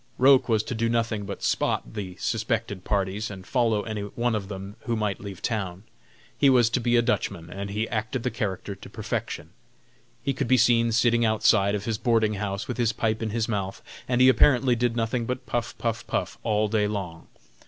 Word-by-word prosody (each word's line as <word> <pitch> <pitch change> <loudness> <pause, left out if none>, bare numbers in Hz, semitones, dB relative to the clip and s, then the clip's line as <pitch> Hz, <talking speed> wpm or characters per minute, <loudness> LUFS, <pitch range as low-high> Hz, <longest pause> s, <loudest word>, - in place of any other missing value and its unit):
Roch 130 -1 +5
was 110 -2 +3
to 125 - -4
do 115 0 0
nothing 115 -3 0
but 100 - -6
"spot" - - 0
the 95 -4 -5
suspected 110 -3 -2
parties 100 +1 -1
and 95 -2 -9
follow 115 -4 +1
any 110 -2 -4
one 120 +4 -1
of 105 -3 -2
them 95 0 -7
who 120 - 0
might 105 -3 -2
leave 100 -1 -8
town. 95 -5 -2 0.5
He 140 - +4
was 120 -3 +4
to 125 - +1
be 120 0 +1
a 120 - +4
Dutchman, 85 -6 -2
and 100 +1 -5
he 105 +2 -1
acted 110 +2 -2
the 125 - -1
character 100 -3 -3
to 95 - -12
perfection. - - -4 0.7
He 140 - 0
could 135 -1 -2
be 130 +1 +5
seen 115 -1 +4
sitting 120 +1 +3
outside 110 -2 +3
of 100 0 -4
his 110 -2 -2
boarding 115 -3 +2
house 100 -1 -3
with 125 - -4
his 115 -2 +1
pipe 110 0 -1
in 110 - -1
his 110 +1 -1
mouth, 100 -4 -3 0.3
and 125 0 +2
he 130 - +8
apparently 130 0 +5
did 120 0 0
nothing 115 0 -1
but 125 0 -3
puff, 120 -1 -3
puff, 115 -1 -2
puff - - -2
all 110 -1 +1
day 105 -1 +1
long. 95 -6 -5
110 Hz, 205 wpm, -26 LUFS, 100-120 Hz, 0.7 s, he